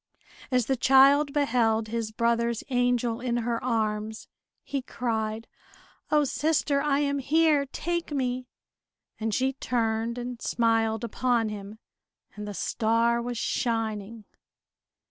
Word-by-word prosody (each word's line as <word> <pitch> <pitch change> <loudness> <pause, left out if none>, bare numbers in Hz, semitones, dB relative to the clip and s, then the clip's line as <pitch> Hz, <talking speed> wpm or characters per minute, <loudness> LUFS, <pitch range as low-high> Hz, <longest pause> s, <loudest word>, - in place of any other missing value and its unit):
As 250 -3 +2
the 265 - +1
child 275 +3 +5
beheld 230 -6 +1
his 230 -1 -2
brother's 235 0 0
angel 245 -2 +1
in 240 -1 -1
her 235 -1 -1
arms, 220 -2 -2 0.4
he 275 -1 -3
cried, 225 -3 -3 0.6
"O, 300 -1 +4
sister, 290 0 +1
I 285 -1 +1
am 280 -1 0
here! 295 0 +3
Take 340 +4 -3
me!" 255 -2 -2 0.7
And 220 0 -1
she 260 +5 +1
turned 230 -2 -1
and 245 -1 -6
smiled 225 -1 +1
upon 235 -1 0
him, 205 0 -8 0.6
and 210 0 -6
the 205 - -6
star 230 +2 +1
was 240 0 -4
shining. 225 -2 -2
235 Hz, 125 wpm, -27 LUFS, 225-265 Hz, 0.7 s, child